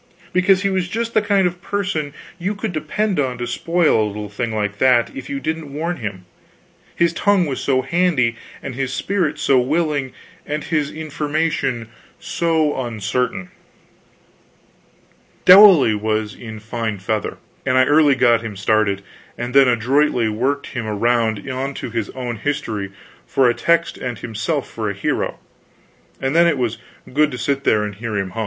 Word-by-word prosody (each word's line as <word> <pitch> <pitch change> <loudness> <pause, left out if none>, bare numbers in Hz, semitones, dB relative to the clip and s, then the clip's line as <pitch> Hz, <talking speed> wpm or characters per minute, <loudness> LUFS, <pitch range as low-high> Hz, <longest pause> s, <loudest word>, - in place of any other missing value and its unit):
Because 185 +1 +3
he 200 - +2
was 185 -1 0
just 230 +3 -3
the 215 - +4
kind 200 -2 +2
of 175 0 -2
person 185 -8 -2 0.3
you 195 +4 -2
could 205 -2 -4
depend 185 +5 -1
on 130 -3 -1
to 120 - -3
spoil 165 +1 +2
a - - 0
little 105 0 -6
thing 115 +3 -3
like 105 -1 -2
that 125 -3 +3
if 135 -1 -7
you 140 - -3
didn't 160 -1 -4
warn 165 +5 -3
him, 100 -6 -6 0.7
his 170 -1 +2
tongue 200 +1 +2
was 140 -4 -3
so 130 -2 +1
handy, 135 -6 +1 0.3
and 140 - -5
his 130 +1 -3
spirit 170 -1 -1
so 135 -3 +3
willing, 145 0 0 0.3
and 150 +1 -4
his 150 -3 -1
information 150 -5 -2 0.3
so 160 -5 0
uncertain. 110 -3 -2 1.9
Dowley 185 - +8
was 110 0 -1
in 110 -2 -9
fine 110 0 -3
feather, 105 +2 -3 0.3
and 130 -1 +1
I 130 - +6
early 145 0 +4
got 120 -3 +4
him 110 -3 -6
started, 100 0 +1 0.3
and 120 +1 -4
then 135 -1 +6
adroitly 125 0 +2
worked 130 +6 -1
him 120 -4 -3
around 110 +1 0
onto 130 -1 -4
his 115 -2 -2
own 125 -3 -4
history 110 -8 -3 0.4
for 135 -2 +3
a 120 - +3
text 170 +7 +1
and 125 -3 -4
himself 120 +8 -3
for 110 -2 -4
a 100 - -4
hero, 100 - -2 0.8
and 135 +3 -1
then 170 +1 +6
it 160 -4 +2
was 120 -3 -2 0.3
good 150 +2 +3
to 125 - -6
sit 140 +3 -1
there 105 -1 +3
and 105 0 -4
hear 110 +1 -4
him 95 -2 -2
hum. 115 - -6
130 Hz, 170 wpm, -20 LUFS, 115-160 Hz, 1.9 s, Dowley